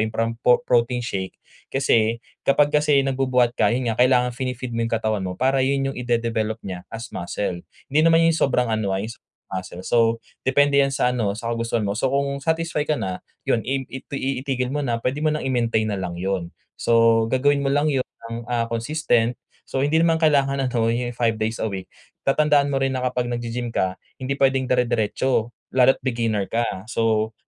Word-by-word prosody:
yung 110 - +1
parang 115 +1 -1
pro 125 0 +5
protein 120 0 +1
shake. 95 -5 -4 0.3
Kasi 115 -4 +2 0.3
kapag 145 +1 +4
kasi 150 -1 +3
nagbubuhat 130 -2 +2
ka - - +2
yun 120 -1 0
nga 110 - -3
kailangan 125 -1 +4
fini-feed 125 -1 -4
mo 115 - -2
'yong - - -11
katawan 110 -2 -1
mo 90 -1 -4
para 135 +1 +2
yun 135 +1 +1
yung - - -12
i-de-develop 115 -3 -1
niya 95 -2 -5
as 115 +1 -8
muscle. 90 0 -3 0.3
Hindi 150 - +4
naman 165 +1 +5
yung 165 - +4
sobrang 125 -6 +1
ano, 110 -2 0
ah, 100 - -3
yung 115 - -5
sa - - -18 0.3
muscle. 95 -1 -6
So, 120 - +1 0.5
depende 140 +1 +4
yan 135 -1 +3
sa 130 -2 +2
ano 110 -5 -1
sa 115 +2 -4
kagustuhan 115 -1 -1
mo. 100 +1 -2
So, - - +1
kung 140 +1 0
satisfy 160 +1 -1
ka 155 - +2
na 95 -9 -3 0.2
yun - - +1
im 135 +1 0
itui 135 0 -4
itigil 130 -2 -1
mo 145 - -2
na, 120 -5 -1
puwede 130 +3 -1
mo 155 - -1
nang 155 - -3
i-maintain 115 -4 0
na 100 - -2
lang 90 -2 -4
yun. 90 -1 -3 0.2
So, 115 -1 +4
gagawin 140 +4 +2
mo 140 - -1
lang 145 +2 +2
yun 135 -3 0 0.2
ng, 115 - -3
ah, 115 -1 -1
consistent. 120 -1 +1 0.3
So, 135 - -2
hindi 145 +3 +2
naman 165 0 +2
kailangan 140 -3 +3
ano 120 -3 0
yung 120 +1 0
5 115 -2 +2
days 110 +1 -2
a - - -1
week. 95 -3 -5 0.3
Tatandaan 145 0 +3
mo 135 - +1
rin 135 0 0
na 130 - -2
kapag 125 -1 -1
nag-gi-gym 120 0 -4
ka 95 0 0 0.2
hindi 140 +2 -2
pwedeng 135 -1 +2
dire-diretso, 120 -1 +1 0.2
lalo't 130 +1 +5
beginner 115 -5 0
ka. 115 -2 -2
So, 110 -1 0
125 Hz, 200 wpm, -23 LUFS, 115-135 Hz, 0.5 s, pro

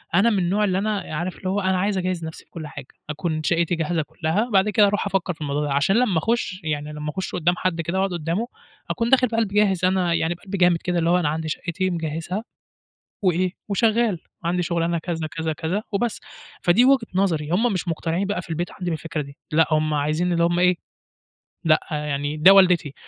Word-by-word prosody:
أنا 200 +6 +5
من 205 -4 +1
النوع 190 +4 +1
اللي 190 -3 +1
أنا 210 +1 -1
عارف 175 +3 -3
اللي 185 - -4
هو 195 +2 0
أنا 190 -1 +1
عايز 200 +1 0
أجهّز 180 -2 -2
نَفْسي 160 - -8
في - - -43
كُلّ 160 -3 -7
حاجة 140 -3 -9 0.2
أكُون 155 +1 -2
شقتي 170 +1 +1
جاهزة 165 0 -1
كُلّها، 165 +9 -1
بعد 195 +2 +4
كده 205 0 +5
أرُوح 205 0 0
أفكر 195 -2 -1
في 160 - -19
الموضوع 145 0 -1
ده 145 -2 -1
عشان 145 +8 +2
لمّا 230 -7 +2
أخش 205 +1 -1
يعني 150 -1 -3
لمّا 150 0 -5
أخش 185 +4 -4
قدّام 175 +1 +2
حد 175 -3 -1
كده 170 +3 -2
وأقعد 190 -1 0
قدامه 170 +7 -2 0.4
أكون 230 -1 -1
داخل 255 -1 +5
بقلب 225 -1 0
جاهز 195 -3 +2
أنا 185 -2 +2
يعني 165 0 +1
بقلب 190 +3 -7
جامد 175 -2 +4
كده 175 +1 -1
اللي 165 0 +1
هو 175 - +4
أنا 150 - +1
عندي 160 +1 -3
شقتي 180 +4 -2
مجهزها، 165 +4 -3 0.8
وإيه 185 -1 +1 0.2
وشغال 220 -1 +2 0.3
وعندي 180 +1 0
شغلانة 170 0 0
كذا، 165 -1 -3
كذا، 160 0 -3
كذا، 160 +7 -2
وبس، 230 +3 -1 0.4
فدي 180 +8 +5
وجهة 265 -3 +4
نظري 165 -6 0
هُم 220 +6 +2
مش 185 -1 -3
مقتنعين 165 +3 -1
بقى 195 -2 -2
في 170 - -14
البيت 170 +2 -2
عندي 180 -2 -4
بالفكرة 160 -1 -3
دي، 140 +1 -12 0.2
لأ 160 +1 +4
هُم 155 0 +2
عايزين 155 +5 0
اللي 170 0 +2
هُم 175 +1 +1
إيه 180 0 +4 0.9
لأ 155 -2 +4
يعني 150 -1 -2
ده 180 +6 +8
والدتي. 180 -7 +4
175 Hz, 215 wpm, -23 LUFS, 160-195 Hz, 0.9 s, ده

